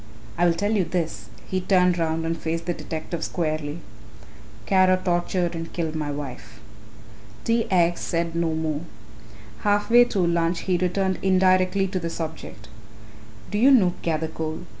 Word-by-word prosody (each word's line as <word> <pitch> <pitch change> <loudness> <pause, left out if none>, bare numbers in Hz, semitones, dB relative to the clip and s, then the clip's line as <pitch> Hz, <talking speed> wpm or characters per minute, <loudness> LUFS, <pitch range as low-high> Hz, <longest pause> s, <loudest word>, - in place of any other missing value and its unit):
I 175 +1 +3
will 170 - +2
tell 205 +5 -1
you 210 -4 +2
this," 155 - -3 0.2
he 185 0 -1
turned 180 -2 +3
round 165 0 -1
and 165 0 -1
faced 165 +1 -3
the 175 - -1
detective 160 0 -5
squarely, 155 -2 -2 0.8
"Kara 185 - +4
tortured 175 -1 0
and 165 0 -6
killed 160 -3 -2
my 155 -2 -3
wife." 125 -7 -7 0.8
T. 230 0 +1
X. 175 -2 +2
said 170 0 -1
no 165 -1 0
more. 155 -2 -2 0.8
Half 205 +2 +1
way 240 +1 +8
through 195 -6 0
lunch 170 0 +1
he 185 - 0
returned 185 +1 0
indirectly 185 0 +3
to 185 0 -2
the 170 -1 -3
subject. 160 -10 -7 0.8
"Do 205 - 0
you 255 +5 +6
know 205 -10 +5
Gathercole?" 160 0 -3
170 Hz, 155 wpm, -24 LUFS, 160-185 Hz, 0.8 s, way